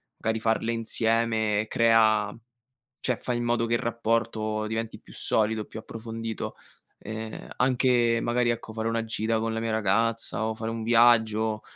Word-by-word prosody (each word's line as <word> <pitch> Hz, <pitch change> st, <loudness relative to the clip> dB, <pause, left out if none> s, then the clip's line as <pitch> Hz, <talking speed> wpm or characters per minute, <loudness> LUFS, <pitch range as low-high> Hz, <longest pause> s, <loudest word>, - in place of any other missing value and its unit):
magari 110 Hz, 0 st, -2 dB
farle 115 Hz, +1 st, 0 dB
insieme 115 Hz, -2 st, +1 dB
crea 110 Hz, -3 st, +3 dB, 0.7 s
cioè 125 Hz, -, 0 dB
fai 120 Hz, +1 st, -2 dB
in 120 Hz, -, -2 dB
modo 120 Hz, 0 st, +1 dB
che 115 Hz, -, -2 dB
il -, -, +2 dB
rapporto 115 Hz, -2 st, -1 dB
diventi 110 Hz, +1 st, -4 dB
più -, -, -16 dB
solido, 110 Hz, 0 st, +1 dB
più -, -, -9 dB
approfondito. 115 Hz, 0 st, -6 dB, 0.4 s
Ehm, 110 Hz, 0 st, -7 dB
anche 125 Hz, -2 st, +3 dB
magari, 120 Hz, 0 st, +1 dB
ecco, 115 Hz, -1 st, -4 dB
fare 110 Hz, 0 st, -2 dB
una 115 Hz, 0 st, -1 dB
gita 110 Hz, 0 st, 0 dB
con 115 Hz, 0 st, -2 dB
la 115 Hz, -, -2 dB
mia 115 Hz, 0 st, -2 dB
ragazza, 110 Hz, +2 st, +1 dB
o 110 Hz, -, -1 dB
fare 110 Hz, +1 st, -4 dB
un 115 Hz, 0 st, -4 dB
viaggio, 110 Hz, -2 st, +3 dB
115 Hz, 160 wpm, -26 LUFS, 110-115 Hz, 0.7 s, crea